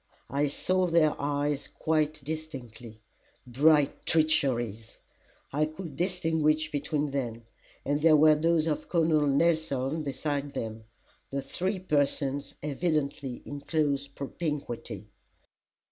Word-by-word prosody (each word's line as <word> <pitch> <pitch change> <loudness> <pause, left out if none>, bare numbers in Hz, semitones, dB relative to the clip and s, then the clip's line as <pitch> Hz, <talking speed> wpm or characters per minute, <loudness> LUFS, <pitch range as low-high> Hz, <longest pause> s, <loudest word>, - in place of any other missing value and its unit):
I 145 +2 +2
saw 185 +6 +1
their 165 -3 +4
eyes 145 0 -1
quite 155 -2 -1
distinctly. 130 -7 -7 0.5
Bright 145 +3 +3
treacheries! 125 -9 +1 0.6
I 150 +2 +2
could 155 -1 -8
distinguish 160 -3 +1
between 145 0 -1
them 120 -4 -3 0.4
and 145 +1 0
there 160 0 +6
were 155 +1 +7
those 160 +1 +2
of 155 -2 -2
Col. 170 -2 +2
Nelson 155 -1 +2
beside 145 0 -3
them 110 0 -5 0.4
the 140 0 -3
three 185 +8 -2
persons 145 -4 0
evidently 145 -4 -2
in 145 - -6
close 145 -2 0
propinquity. 140 - -5
145 Hz, 110 wpm, -29 LUFS, 140-155 Hz, 0.6 s, were